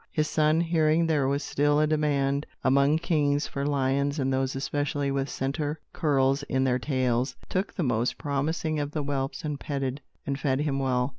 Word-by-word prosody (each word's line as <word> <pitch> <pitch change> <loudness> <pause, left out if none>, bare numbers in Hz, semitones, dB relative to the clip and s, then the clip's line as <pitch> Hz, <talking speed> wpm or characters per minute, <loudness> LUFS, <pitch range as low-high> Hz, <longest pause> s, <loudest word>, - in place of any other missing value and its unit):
His 155 -1 0
son, 155 +1 +2
hearing 165 -1 +2
there 150 -4 +2
was 140 +1 0
still 145 +1 +2
a 155 - +4
demand, 145 -2 +1 0.2
among 140 +3 +4
kings, 150 -3 +1
for 140 - -4
lions, 140 +1 +1
and 135 -2 0
those 130 0 0
especially 145 0 -1
with 135 0 -1
centre 145 +3 -2
curls 135 -3 +2
in 130 0 +1
their 125 -1 +2
tails, 130 -2 0
took 190 +2 -1
the 180 - -1
most 120 -2 0
promising 155 +2 -1
of 145 0 -3
the 150 - -1
whelps 140 +1 -3
and 150 -2 -3
petted 135 -1 -3 0.2
and 140 0 -2
fed 135 -1 0
him 140 -2 0
well. 125 -1 +1
140 Hz, 180 wpm, -27 LUFS, 135-150 Hz, 0.2 s, a